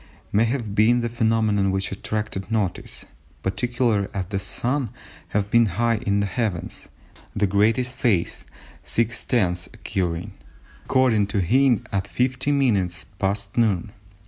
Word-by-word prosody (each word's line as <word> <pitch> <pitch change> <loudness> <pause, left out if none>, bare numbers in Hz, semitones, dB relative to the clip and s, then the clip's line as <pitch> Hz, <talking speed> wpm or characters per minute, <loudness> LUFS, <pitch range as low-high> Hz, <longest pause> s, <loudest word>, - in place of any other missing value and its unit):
may 110 +3 +4
have 115 -4 -2
been 115 +4 +4
the 120 - -1
phenomenon 110 -3 +2
which 95 0 -1
attracted 105 0 -3
notice, 105 -5 -2 0.4
particularly 115 +1 +1
as 95 -2 -1
the 100 -1 -1
Sun 125 +8 -1
would 125 - -4 0.4
have 105 0 -1
been 115 -1 +5
high 115 -1 +2
in 100 -3 0
the - - +1
heavens, 100 -3 -3 0.5
the 105 - +2
greatest 110 +6 +2
phase 100 -10 +1 0.4
(6/10ths) 110 -6 0
occurring, 90 +1 -3 0.5
according 120 -6 +3
to 100 0 -1
Hind, 130 +2 +3
at 100 0 -1
50 130 +5 0
minutes 100 -11 +1 0.2
past 100 0 -1
noon. 110 -4 +1
105 Hz, 135 wpm, -23 LUFS, 100-120 Hz, 0.5 s, been